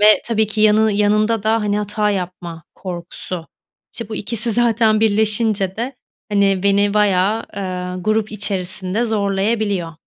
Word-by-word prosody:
ve 210 0 +6
tabii 220 -2 +1
ki 215 +1 -3
yanını 215 0 +4
yanında 210 +1 +2
da, 220 +1 +1
hani, 210 -1 0
hata 210 0 -1
yapma 180 -4 -5
korkusu. 175 -1 -5 0.5
İşte, 230 -3 -7
bu 215 - -5
ikisi 230 +2 -1
zaten 225 -2 +2
birleşince 215 -2 +1
de, 245 +3 -4 0.3
hani, 200 -2 +2
beni 200 0 +2
baya, 210 +1 +2
ııı, 180 -1 -4
grup 215 +1 0
içerisinde 195 +1 -2
zorlayabiliyor. 200 -3 -1
210 Hz, 135 wpm, -19 LUFS, 195-220 Hz, 0.5 s, ve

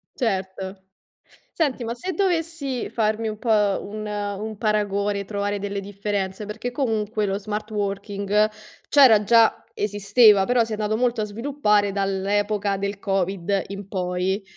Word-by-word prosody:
Certo. 190 -4 -3 0.7
Senti, 280 -7 -1
ma 230 0 -3
se 370 +9 -4
dovessi 330 -8 -1
farmi 220 0 0
un 215 -1 -4
po' 240 - -4 0.3
un 215 +1 -6
un 205 +1 -4
paragone, 205 -2 0
trovare 205 0 -2
delle 200 0 -3
differenze, 200 0 -3
perché 220 +4 -5
comunque 220 -5 -1
lo 195 0 -1
smart 210 +1 -4
working 200 0 0 0.4
c'era 250 -8 +7
già, 230 +2 +4
esisteva, 205 0 +4
però 245 -1 +3
si 225 - -7
è 215 - 0
andato 215 +1 0
molto 245 -2 +1
a 210 - 0
sviluppare 210 -3 +1
dall'epoca 200 +1 0
del 200 +1 -3
Covid 195 0 0
in 200 0 -7
poi. 185 +1 -1
205 Hz, 140 wpm, -23 LUFS, 200-225 Hz, 0.7 s, c'era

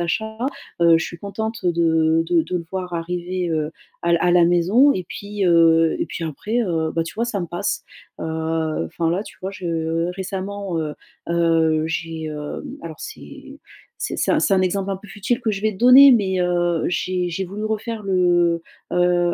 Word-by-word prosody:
achat. 220 +6 -2 0.4
Heu, 170 -1 +6
je - - -2
suis 170 - -7
contente 220 +3 -5
de 165 -1 +3
de 170 -1 +3
de 180 - -3
le 170 - -4
voir 185 -2 -4
arriver, 175 +1 -3
heu, 155 -1 -1 0.3
à 170 - +1
l 170 - +4
à 180 - +3
la 175 -1 +5
maison 185 +11 +4
et 185 - -3
puis, 205 0 -4
heu, 165 -1 +5
et - - 0
puis 165 - -5
après, 210 - -2
heu, 160 -5 -1
bah, 165 - 0
tu 165 - -8
vois, 230 - 0
ça 210 -5 -2
me 175 - -3
passe. 175 +1 -3 0.4
Heu, - - -4 0.6
enfin 165 - -1
là, 180 +4 0
tu - - -13
vois, 190 - -4
je 185 -2 -7
heu, 165 +1 -1
récemment, 195 -1 -4
heu 150 -2 -3 0.3
heu, 165 -2 +2
j'ai, 165 0 -4
hem 150 -1 -6
alors 165 -2 -8
c'est - - -10 0.4
c'est - - -1
un - - +3
c'est 195 - +3
un 185 - +3
exemple 195 +1 -1
un 195 - -1
peu 200 +2 -14
futile 210 +4 -2
que 220 - 0
je 195 -2 -3
vais 215 +1 +1
te 190 - -12
donner, 260 +3 +9
mais, 190 -5 +2
heu, 175 -2 +1
j'ai 180 +1 -1
j'ai 190 +3 -2
voulu 200 +4 -6
refaire 220 +1 -3
le, 175 -3 +2 0.3
heu 175 0 +2
175 Hz, 200 wpm, -21 LUFS, 165-195 Hz, 0.6 s, donner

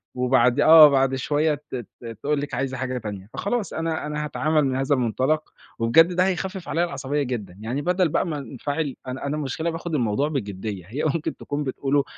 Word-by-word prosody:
وبعد 125 +1 +3
آه، 155 0 +9
بعد 135 -1 +2
شوية 150 +3 +1
ت 145 -2 -10
ت 120 0 -9 0.2
تقول 145 0 +1
لِك 145 - -6
عايزة 135 -1 -2
حاجة 130 0 -3
تانية، 105 -3 -7
فخلاص 210 +1 -2
أنا 160 -1 -2
أنا 150 0 -3
هاتعامل 155 +1 +1
من 130 - 0
هذا 135 +2 +1
المنطلق، 130 +6 0 0.3
وبجد 165 +10 +5
ده 180 +1 +3
هيخفِّف 190 0 -3
عليَّ 165 +3 +1
العصبية 140 -2 -2
جدًا، 105 -8 -5
يعني 120 +6 -3
بدل 180 +1 +1
بقى 170 - +1
ما 155 -3 -3
أنفعل، 140 +2 -4
أنا 130 +2 -5
أنا 145 +2 -2
المشكلة 155 +3 -2
باخد 165 -1 -4
الموضوع 120 +2 +1
بجدية، 100 - -4
هي 130 +8 -4
ممكن 155 +1 -1
تكون 145 0 -3
بتقوله 140 +1 0
140 Hz, 190 wpm, -24 LUFS, 125-155 Hz, 0.3 s, آه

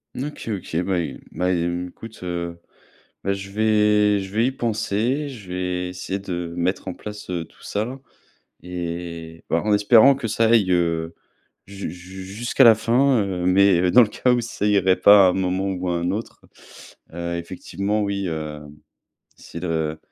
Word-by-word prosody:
OK 145 -1 -6
OK, 95 -5 -5
bah 95 -2 0
é 85 - -4
bah, 90 +1 0
écoute, 90 +5 -4
heu, 85 -1 -4 0.7
bah, 100 - +1
je 100 0 -6
vais 105 -1 +3
je 95 - -6
vais 115 +3 +3
y - - -3
penser, 120 +4 -1
je 105 -8 -11
vais 90 0 -2
essayer 95 +2 -4
de 90 -3 -5
mettre 90 +2 -1
en - - -2
place, 105 0 -9
heu, 85 -2 -2
tout - - -22
ça 115 +6 -3 0.6
et 85 -2 -6
bah, 85 - +2
en 105 0 +1
espérant 115 +6 +6
que 130 -4 -4
ça 115 +2 +2
aille, 110 -5 +4
heu, 85 -1 0 0.5
ju 100 -4 -6
ju 95 +2 -10
jusqu'à 120 +7 +1
la 115 -1 +9
fin, 120 +2 +2
heu, 90 -2 -3
mais 90 -1 +4
dans 125 - +8
le 110 - +2
cas 125 +4 +1
où 120 - +2
ça 110 -3 -3
irait 95 -3 +3
pas 100 -2 +7
à - - +4
un - - -2
moment 95 +1 -1
ou 90 0 -3
à 85 - 0
1 85 +1 -1
autre, 110 +4 -5 0.7
heu, 85 0 -3
effectivement, 100 +4 -3
oui, 100 -1 -2
heu, 75 -2 -5 0.8
c'est 85 - -10
de 80 -3 -2
95 Hz, 175 wpm, -22 LUFS, 90-105 Hz, 0.8 s, la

